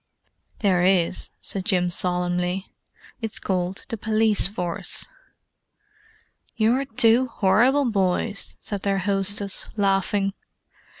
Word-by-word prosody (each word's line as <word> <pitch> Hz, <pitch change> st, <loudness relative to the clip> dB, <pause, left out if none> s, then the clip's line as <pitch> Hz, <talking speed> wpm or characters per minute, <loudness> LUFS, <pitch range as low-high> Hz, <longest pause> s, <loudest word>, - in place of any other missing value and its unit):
"There 185 Hz, -5 st, +2 dB
is," 185 Hz, -1 st, +1 dB
said 195 Hz, -, -3 dB
Jim 180 Hz, -4 st, +1 dB
solemnly. 180 Hz, +1 st, +1 dB, 0.5 s
"It's 225 Hz, -2 st, -4 dB
called 185 Hz, 0 st, -3 dB
the 230 Hz, -, -4 dB
Police 215 Hz, -1 st, +1 dB
Force." 180 Hz, -4 st, -4 dB, 1.5 s
"You're 235 Hz, +5 st, +1 dB
two 235 Hz, 0 st, +4 dB
horrible 250 Hz, +6 st, +2 dB
boys!" 200 Hz, -1 st, 0 dB
said 205 Hz, -2 st, -4 dB
their 200 Hz, -1 st, 0 dB
hostess, 195 Hz, +1 st, -1 dB
laughing. 195 Hz, 0 st, +1 dB
195 Hz, 100 wpm, -23 LUFS, 185-220 Hz, 1.5 s, two